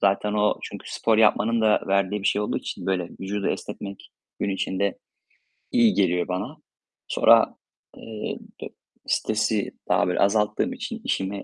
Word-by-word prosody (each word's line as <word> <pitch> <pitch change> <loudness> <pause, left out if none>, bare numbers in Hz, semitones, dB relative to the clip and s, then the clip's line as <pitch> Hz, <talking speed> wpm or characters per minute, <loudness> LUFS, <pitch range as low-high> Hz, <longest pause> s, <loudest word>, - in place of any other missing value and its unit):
Zaten 100 +1 +2
o 105 0 +2
çünkü - - -8
spor 110 -1 +2
yapmanın 110 +1 +4
da 110 -1 +4
verdiği 100 +1 +1
bir - - 0
şey 100 - +1
olduğu - - -1
için - - -7
böyle 90 -3 0
vücudu 100 +1 -2
esnetmek 100 -1 -6 0.3
gün 100 - 0
içinde 95 0 -1 0.7
iyi 115 -3 +5
geliyor 90 -2 +1
bana. 90 0 -4 0.5
Sonra, - - +5 0.4
eee, 110 -1 -5 0.2
d - - -5 0.4
stresi 110 -1 0 0.2
daha 90 0 +3
böyle 90 - 0
azalttığım 105 +1 +2
için - - -6
işime 100 +1 -2
100 Hz, 145 wpm, -25 LUFS, 95-105 Hz, 0.7 s, iyi